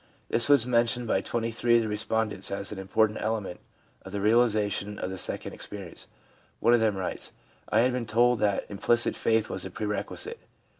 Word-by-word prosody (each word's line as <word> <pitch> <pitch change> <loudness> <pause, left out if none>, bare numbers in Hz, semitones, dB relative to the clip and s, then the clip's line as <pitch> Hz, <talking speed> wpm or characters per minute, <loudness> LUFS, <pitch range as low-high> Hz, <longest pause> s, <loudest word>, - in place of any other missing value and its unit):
This 120 +4 +4
was 140 -5 +6
mentioned 120 0 +2
by 95 -4 +1
23 120 +2 0
of 115 - +5
the - - -2
respondents 105 -1 -1
as 100 0 -4
an 105 - -6
important 105 +3 +1
element 110 -4 -2 0.4
in 95 - -10
the 100 - -3
realisation 105 -2 +2
of 95 - -4
the 95 - -5
second - - -3
experience. 100 -4 -8 0.5
One 120 - +4
of 120 - +5
them 110 -2 +2
writes: 95 - -4 0.2
' - - -24
I 110 - +4
had 125 +1 +2
been 125 -2 -3
told 120 +2 +3
that 100 -2 +1
implicit 115 +4 +1
faith 110 -1 +1
was 95 -1 -4
a 95 - -5
pre 105 +4 -5
requisite. 105 0 -4
110 Hz, 195 wpm, -27 LUFS, 100-115 Hz, 0.5 s, was